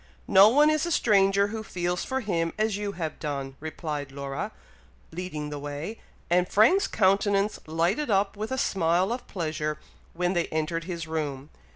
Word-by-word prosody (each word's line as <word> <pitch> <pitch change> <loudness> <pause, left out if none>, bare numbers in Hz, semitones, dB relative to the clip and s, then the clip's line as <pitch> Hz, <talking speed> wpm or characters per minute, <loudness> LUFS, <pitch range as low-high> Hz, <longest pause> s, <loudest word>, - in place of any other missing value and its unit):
"No 195 +2 +8
one 295 +5 +5
is 310 +2 +1
a - - -2
stranger 200 -6 +3
who 220 +1 -4
feels 180 -3 -2
for 265 0 -2
him 170 -6 -1
as 215 -1 +1
you 205 0 -3
have 165 -4 -4
done," 140 -3 -4
replied 150 -2 -5
Laura, 140 +9 -4 0.6
leading 160 -4 -5
the 145 - -4
way, 145 +9 -6 0.3
and 180 +1 +2
Frank's 245 - +4
countenance 200 +1 +2
lighted 175 - 0
up 195 0 +2
with 215 +4 -5
a 260 - -1
smile 180 -2 +1
of 250 - -7
pleasure 155 -4 -3 0.4
when 180 +1 0
they 175 -2 0
entered 160 +1 -2
his 170 -3 -4
room. 150 -3 -4
180 Hz, 170 wpm, -27 LUFS, 155-205 Hz, 0.6 s, No